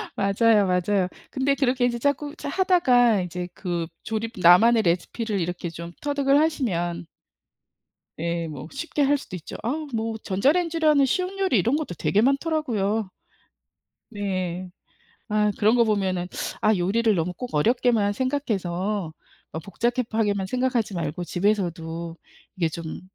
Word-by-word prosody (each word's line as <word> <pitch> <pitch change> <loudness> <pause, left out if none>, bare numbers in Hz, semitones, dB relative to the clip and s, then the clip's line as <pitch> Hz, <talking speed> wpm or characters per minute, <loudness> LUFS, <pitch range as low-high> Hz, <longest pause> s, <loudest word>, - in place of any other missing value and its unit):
맞아요, 205 +1 +3
맞아요. 185 +1 +1 0.2
근데 275 +1 +1
그렇게 255 -3 +1
이제 235 -1 -1
자꾸 285 +3 -1
자 285 - -6
하다가 255 - +4
이제 180 0 -4
그 175 -3 -3 0.2
조립 225 +1 -3
나만의 215 +7 +6
레시피를 200 +5 -1
이렇게 175 0 -3
좀 170 +1 -8
터득을 285 -1 +2
하시면 185 - -1 1.1
예 170 0 -2
뭐 150 -1 -7
쉽게 295 - -2
할 285 +1 +3
수도 225 -9 -9
있죠. 170 - -8
아 300 +7 -2
뭐 225 0 -2
전자레인지로 315 - +1
하는 285 -2 +5
쉬운 365 +8 -1
요리 375 - +2
이런 235 +9 +2
것도 300 - -3
되게 210 - +2
많더라고요. 240 - 0 1.0
네. 185 -3 -3 0.6
아 210 0 +2
그런 215 +2 +4
거 235 - +5
보면은 190 -5 0 0.3
'아 215 0 +4
요리를 210 +5 +2
너무 180 +1 -1
꼭 250 +7 -7
어렵게만 220 +4 +2
생각해서 205 - -2 0.4
어 160 - -4
복잡하게만 220 -1 -1
생각하지 250 -3 0
말고 170 0 -3
집에서도 170 -4 -2 0.4
이게 175 -4 +1
좀 160 0 -7
215 Hz, 305 characters per minute, -24 LUFS, 180-255 Hz, 1.1 s, 나만의